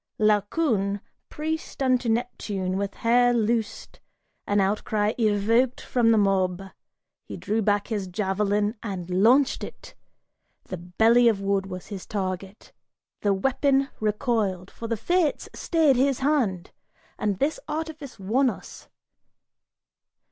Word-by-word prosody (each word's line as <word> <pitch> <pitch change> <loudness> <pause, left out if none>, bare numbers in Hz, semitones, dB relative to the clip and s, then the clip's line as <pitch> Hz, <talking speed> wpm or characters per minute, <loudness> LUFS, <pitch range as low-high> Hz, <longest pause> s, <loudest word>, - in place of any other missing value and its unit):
Laocoon, 210 0 +1 0.3
priest 315 -2 -4
unto 255 -2 +2
Neptune, 210 -5 -2
with 200 0 -3
hair 245 +1 +3
loosed, 225 -1 -2 0.5
An 205 0 +2
outcry 210 +2 0
evoked 225 +4 +2
from 240 -2 +1
the 225 - +5
mob: 190 -3 +2 0.6
he - - -8
drew 215 +2 -1
back 205 +1 +1
his 205 -4 -2
javelin 205 +3 0
And 185 -5 -5
launched 260 +4 +4
it! - - -10 0.7
The 185 - -6
belly 225 +8 +3
of 220 -4 +3
wood 195 -1 0
was 185 -1 -7
his 195 -3 -7
target. 190 0 -5 0.5
The 205 - +2
weapon 270 +5 +1
Recoiled, 210 -4 -1
for 230 - -7
the 230 0 -1
fates 340 - 0
stayed 315 -6 +2
his 270 0 +1
hand, 250 - 0 0.5
and 205 -2 0
this 285 +8 0
artifice 305 -3 -5
won 235 +7 +2
us. - - -9
215 Hz, 125 wpm, -25 LUFS, 195-250 Hz, 0.7 s, the